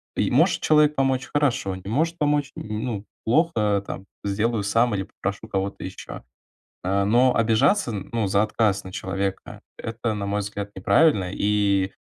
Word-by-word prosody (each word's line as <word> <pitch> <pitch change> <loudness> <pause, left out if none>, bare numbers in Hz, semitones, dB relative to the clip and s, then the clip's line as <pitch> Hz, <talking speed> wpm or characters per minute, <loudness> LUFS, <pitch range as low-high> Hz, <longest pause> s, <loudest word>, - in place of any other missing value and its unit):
и - - 0
может - - +3
человек 150 -1 +4
помочь- 135 -2 0
хорошо, 135 -10 +1
не 95 +1 -9
может 165 +8 0
помочь- 145 -2 +1
ну, 105 -1 -4 0.2
плохо, 110 - +2
там, 95 - -7 0.2
сделаю 105 +2 0
сам 115 +3 +2
или 95 - -1
попрошу 100 +1 -5
кого-то 95 +1 -3
ещё. 95 -8 -8 0.6
Э, 100 +2 +1
но 125 +4 +4
обижаться, 115 - +3
ну, 105 +1 -2
за 100 +2 +3
отказ 105 -2 0
на 95 - -9
человека- 95 0 -4 0.2
это, 115 0 -3
на 105 -1 -3
мой 100 +1 -1
взгляд, 100 0 -5
неправильно, 95 - +3
и, 100 -2 +1
105 Hz, 155 wpm, -24 LUFS, 100-125 Hz, 0.6 s, человек